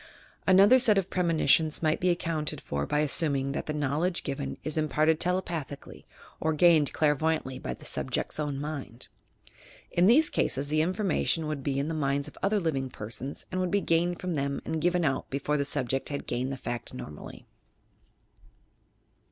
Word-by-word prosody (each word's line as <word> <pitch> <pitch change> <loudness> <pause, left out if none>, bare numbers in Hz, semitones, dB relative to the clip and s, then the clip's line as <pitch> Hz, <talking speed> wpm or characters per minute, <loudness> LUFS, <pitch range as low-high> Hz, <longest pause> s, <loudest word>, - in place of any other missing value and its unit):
Another 195 +7 +7
set 220 -5 +5
of 190 -1 -1
premonitions 160 -3 +2
might 155 -1 +2
be 180 - +1
accounted 160 -4 -1
for 70 - -3
by 150 - +1
assuming 140 -2 +1
that 140 - -4
the - - -1
knowledge 150 +5 -1
given 70 - -4
is 155 - -1
imparted 155 0 +2
tele 180 +1 +1
pathieally 150 -5 -7 0.3
or 160 0 0
gained 155 -2 +4
clairvoyantly 150 -3 0
by - - -5
the - - -13
subject's - - -2
own 145 -2 -2
mind. 140 -5 -6 0.8
In 175 +2 +3
these 295 +8 +5
cases 140 +2 0
the 155 +1 +2
information 180 -2 0
would 150 -2 -3
be 135 0 -2
in 140 +2 -1
the 165 - -2
minds 140 -1 -1
of 150 - -11
other 205 +2 +2
living 140 -7 -1
persons 120 +5 -4
and 185 0 -1
would 185 - 0
be 200 - +2
gained 175 -1 +1
from 180 -1 -3
them 140 -2 -1
and 160 -1 -2
given 175 0 +2
out 135 -3 -1
before 140 +2 -1
the 140 -1 0
subject 135 -2 -1
had 140 -1 -4
gained 130 +2 -2
the 135 - -4
fact 120 +1 -5
normally. 75 -11 -9
155 Hz, 175 wpm, -28 LUFS, 140-175 Hz, 0.8 s, Another